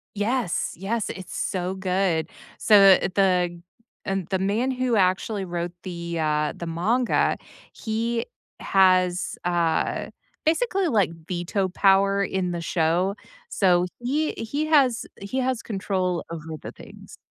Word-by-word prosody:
Yes. 215 -1 -1
Yes, 205 +5 -2
it's 185 -1 -7
so 185 0 -2
good. 185 -4 0 0.3
So, 195 -3 +7
the 180 - -1
the 180 -3 +1 0.4
and 195 -3 -2
the 190 -1 0
man 210 +7 0
who 255 -2 0
actually 190 +1 +1
wrote 175 0 -3
the, 170 -2 -5
uh, 150 -1 0
the 170 - -6
manga, 220 +10 +1 0.4
he 230 +1 -2 0.3
has, 185 -2 +3
uh, 170 -2 0 0.4
basically, 380 +2 +1
like, 205 - +2 0.2
veto 185 +2 -1
power 195 +1 +3
in 185 -2 -1
the 170 - -3
show. 170 +4 +1 0.3
So 180 - +3
he 285 +6 0
he 285 +7 -3
has 270 -7 +3
he 200 +7 -3
has 255 -2 -1
control 185 -4 -2
over 160 -1 -6
the - - -7
things. - - -14
190 Hz, 130 wpm, -24 LUFS, 175-225 Hz, 0.4 s, So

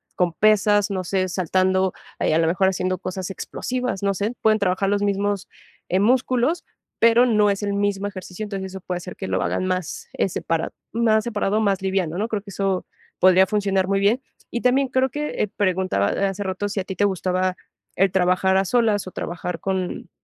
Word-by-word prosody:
con 175 -2 +1
pesas, 210 +1 +3
no 190 -2 -2
sé, 185 +1 0
saltando, 185 +1 +1 0.3
ah, - - 0
y, - - +2
a 160 - +3
lo 165 - +2
mejor, 185 +3 +2
haciendo 185 0 -1
cosas 185 +1 -5
explosivas, 250 +3 -3
no 200 0 +2
sé, 205 +5 -1
pueden 215 0 +4
trabajar 195 0 +1
los 205 0 +1
mismos, 200 -1 0 0.4
eh, 185 - +2
músculos, 255 - +2 0.3
pero 230 +2 +5
no 210 -3 +4
es 200 - -3
el 200 -1 -1
mismo 200 0 0
ejercicio. 190 0 -7
Entonces, 195 -2 -5
eso 190 - -7
puede 180 0 -3
hacer 180 0 -8
que - - -6
lo 95 0 0
hagan 90 - -1
más, 185 -3 -3
eh, - - 0
separado, 165 -2 -2 0.2
más 220 -2 +3
separado, 215 -2 0
más 200 -3 +1
liviano, 190 -4 -1
¿no? 215 +3 0
Creo 210 -3 -2
que 200 - -13
eso 195 -1 -1 0.3
podría 185 0 +6
funcionar 195 -3 +1
muy 195 0 +1
bien. 210 +6 +2 0.3
Y 235 - -2
también, 265 +2 +3
creo 260 +1 +2
que 295 -6 -2
preguntaba 185 - +1 0.2
hace 195 +1 -4
rato, 190 +1 -2
si 200 - -2
a - - -1
ti 190 - -5
te 205 - +2
gustaba 185 -1 0 0.4
el 195 -1 +3
trabajar 185 +1 +2
a 195 - +2
solas 220 -1 +2
o - - -7
trabajar 175 0 -4
con 190 -2 -3
195 Hz, 200 wpm, -23 LUFS, 185-210 Hz, 0.4 s, podría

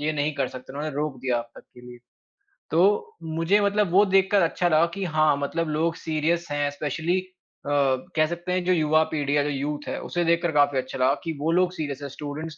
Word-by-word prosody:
ये 155 +1 0
नहीं 150 +1 -1
कर 135 -3 -1
सकते, 130 +1 -10
उन्होंने 150 0 -4
रोक 150 -2 -2
दिया 125 -2 0
अब 120 0 -7
तक - - -10
के 125 - -13
लिए। 120 0 -11 0.7
तो 190 +6 +2
मुझे 165 +5 +1
मतलब 200 -2 +1
वो 200 +3 +6
देखकर 195 +1 +3
अच्छा 175 +2 +1
लगा 155 +1 +4
कि 200 - -3
हाँ, 155 -3 +2
मतलब 160 +3 -2
लोग 165 +2 0
सीरीअस 165 +2 -1
हैं 145 0 0
एस्पेशली 155 +5 -1
अ, 185 -5 -12 0.5
कह 155 - +5
सकते 175 +2 -5
हैं 185 - 0
जो 185 - +3
युवा 155 -1 +3
पीढ़ी 145 -1 0
है, 145 - +3
जो 145 - -2
यूथ 145 +1 -3
है - - -3
उसे 175 -1 -2
देखकर 170 0 +2
काफ़ी 145 -2 +3
अच्छा 130 - -5
लगा 130 +2 +4
कि 165 - -3
वो 160 +2 +1
लोग 180 +1 +2
सीरीअस 145 -5 -5
हैं 140 - -5
स्टूडेंट्स 150 +3 -7
155 Hz, 225 wpm, -25 LUFS, 145-175 Hz, 0.7 s, वो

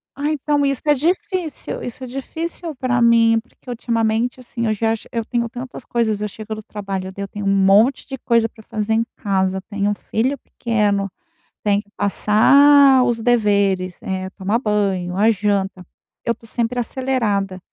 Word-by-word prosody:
Ah, 290 +2 -1
então 290 -1 0
isso 275 -2 -1
é 295 - +5
difícil 340 +1 -2
Isso 245 +2 -7
é - - -6
difícil 320 +5 -5
para 250 -1 0
mim, 230 -1 +5
porque 245 +2 -26
ultimamente, 230 +1 -1
assim, 235 -1 -4
eu 215 - +2
já 225 +1 +1
che 220 - -10
eu 230 -1 -2
tenho 235 -1 -1
tantas 250 +1 -8
coisas, 220 -3 0
eu 210 - -2
chego 215 +2 -7
do 215 - -8
trabalho, 195 -3 -5
daí 200 - -7
eu - - -8
tenho 205 0 -6
um 195 0 +3
monte 215 +7 +4
de 270 -1 -6
coisa 230 -2 +2
pra 220 - -17
fazer 215 0 -2
em 225 +1 +2
casa, 190 -2 0
tenho 205 0 0
um - - 0
filho 250 +7 -1
pequeno, 205 -4 -1 0.5
tem 205 -1 +2
que 205 - -19
passar 265 +7 +5
os 240 -2 0
deveres, 200 -6 +1
eh, 190 0 -4
tomar 200 +4 -1
banho, 195 -5 -1
a 215 +3 +4
janta. 195 -3 -1 0.4
Eu 235 - +1
estou 230 0 -15
sempre 240 +1 -1
acelerada. 225 -7 -1
225 Hz, 180 wpm, -20 LUFS, 200-250 Hz, 0.5 s, é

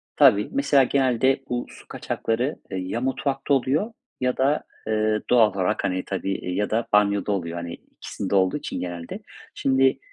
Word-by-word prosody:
Tabii, 100 +1 +5
mesela, 220 - +4
genelde 130 0 +2
bu 120 0 -2
su - - -15
kaçakları, 120 +6 -2
eee, 95 - -3
ya 95 +5 -3
mutfakta 135 +2 -1
oluyor 140 - +1 0.3
ya 125 -1 0
da, 140 +3 +2 0.2
eee, 110 0 +1
doğal 115 -4 +5
olarak, 95 -2 0
hani, 90 0 -1
tabii, 95 0 -2
eee, 90 - -4
ya 105 - 0
da 115 +1 0
banyoda 100 0 +3
oluyor, 85 -4 -2
hani, 85 0 -5
ikisinde 100 +3 -6
olduğu 95 +5 +3
için - - -5
genelde. 85 -2 -5 0.3
Şimdi 135 0 +2
115 Hz, 165 wpm, -24 LUFS, 95-135 Hz, 0.3 s, Tabii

